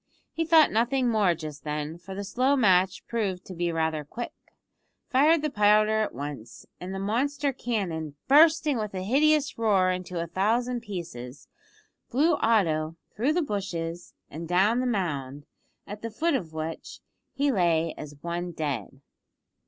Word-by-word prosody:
He 330 - -1
thought 320 -1 +6
nothing 245 +3 +1
more 205 -6 +3
just 150 -3 -8
then, 150 +2 -4
for 190 +2 -9
the 200 - -4
slow 255 +7 +1
match 190 -6 +3
proved 200 -6 -2
to 185 - -8
be 175 -1 -1
rather 160 -2 -1
quick, 235 +11 -6 0.8
fired 295 +4 +4
the 305 - -1
powder 215 0 +4
at 215 - -3
once, 140 -4 -7
and 180 +1 -6
the 190 - -4
monster 275 +8 0
cannon, 175 - -3
bursting 305 -1 +5
with 210 -2 -4
a 185 - -3
hideous 285 +5 +2
roar 195 -5 +3
into 180 -1 -4
a 165 - -1
thousand 235 +8 0
pieces, 165 - -8 0.6
blew 310 +7 +3
Otto 165 -8 +1 0.2
through 260 +8 +1
the 350 0 +1
bushes 175 - -4
and 165 +3 -7
down 195 +7 +3
the 255 - 0
mound, 145 - -2 0.4
at 205 +1 -8
the 230 - -4
foot 320 +9 0
of 180 - -2
which 160 +1 -6 0.4
he 280 +1 +2
lay 170 -6 +1
as 145 -1 -9
one 175 +1 -3
dead. 140 - -4
195 Hz, 160 wpm, -27 LUFS, 165-245 Hz, 0.8 s, thought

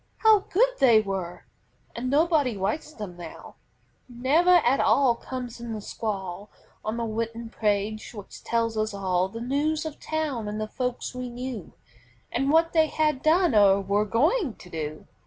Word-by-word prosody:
How 440 -2 +6
good 435 +6 +2
they 235 -5 +6
were! 195 -4 -4 0.5
And 250 +2 -3
nobody 290 - +2
writes 215 +11 -2
them 205 - -8
now; 170 -2 -10 0.6
Never 290 +9 +3
at 255 +3 +3
all 270 -3 +4
comes 245 0 -7
in 235 -1 -5
the 215 - -4
scrawl 200 -2 -5 0.3
On 215 +2 -3
the 235 - -2
written 230 +1 -4
pages 210 0 -1
which 205 -2 -10
told 230 -1 0
us 215 -1 -1
all 185 -1 0
The 230 +4 -7
news 295 +6 0
of 310 -2 -6
town 300 -8 -2
and 210 +1 -4
the 215 - -2
folks 250 +2 -3
we 250 0 -5
knew, 245 -4 -6 0.6
And 270 +3 0
what 325 +2 +3
they 320 -1 +4
had 305 -4 0
done 335 -1 +3
or 200 -2 +6
were 200 +2 +1
going 285 - +1
to 180 - -14
do. 155 -1 -5
235 Hz, 170 wpm, -26 LUFS, 210-285 Hz, 0.6 s, How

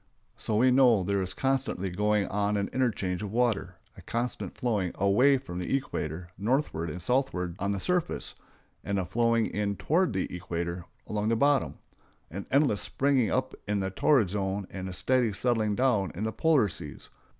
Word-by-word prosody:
So 110 - -2
we 125 +4 +4
know 125 -6 +5
there 100 +1 0
is 95 - -3
constantly 130 -8 -1
going 105 +2 +1
on 105 +1 0
an 100 - -1
interchange 100 -8 0
of 105 -2 -5
water—a 120 -3 -2
constant 120 +2 -4
flowing 105 -8 -1
away 125 +9 +4
from 110 -9 -7
the 90 +9 0
equator 85 - -5
northward 105 - 0
and 90 - -5
southward 90 -7 0
on 100 +2 0
the 100 - -2
surface, 180 - -1 0.5
and 100 0 -1
a 95 - 0
flowing 115 +4 +2
in 100 -1 -2
toward 160 - +1
the 95 - 0
equator 85 0 -4 0.2
along 105 0 -1
the 115 - +2
bottom; 140 +2 +2 0.6
an 100 +4 -6
endless 135 -7 +3
springing 135 -5 +1
up 130 0 -1
in 105 0 0
the 95 0 -2
torrid 115 0 +3
zone 100 0 -2
and 95 -1 -5
a - - -6
steady 125 +4 +2
settling 110 -1 0
down 105 - +2
in 100 - -4
the 110 0 -2
polar 155 -9 +3
seas. 75 -6 -9
105 Hz, 175 wpm, -28 LUFS, 95-125 Hz, 0.6 s, know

